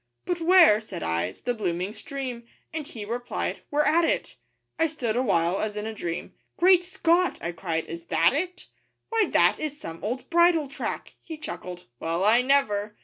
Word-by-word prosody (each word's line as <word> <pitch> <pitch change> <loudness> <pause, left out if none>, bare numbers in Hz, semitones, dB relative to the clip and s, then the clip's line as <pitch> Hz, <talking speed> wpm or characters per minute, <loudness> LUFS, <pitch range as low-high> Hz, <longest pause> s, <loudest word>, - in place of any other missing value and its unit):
'But 350 -1 -2
where,' 330 - +6
said 195 -5 -7
I, 85 +1 0
''s 95 - -15
the 245 - 0
blooming 185 -2 -2
stream?' 245 0 -6 0.3
And 310 -2 -4
he 215 -3 -7
replied, 240 +3 -3
'We're 295 +1 +2
at 315 +3 +3
it!' - - -1 0.4
I 325 - +4
stood 250 -8 -3
awhile, 190 -7 +1
as 210 -1 -3
in 210 - -3
a 220 - -4
dream, 170 -5 -5 0.2
'Great 360 0 +5
Scott!' 360 -1 +1
I 170 - -3
cried, 165 -1 -3
'is 170 0 -8
that 165 +6 +3
it? 360 +5 -3 0.4
'Why, 455 -2 +3
that - - +4
is 295 -1 -4
some 165 0 -8
old 250 +4 -3
bridle 340 -3 +4
track!' 275 - -5
He 320 -2 -8
chuckled, 180 - -7
'Well, 165 +3 -1
I 225 +4 +5
never! 215 -6 +1
240 Hz, 185 wpm, -26 LUFS, -, 0.4 s, where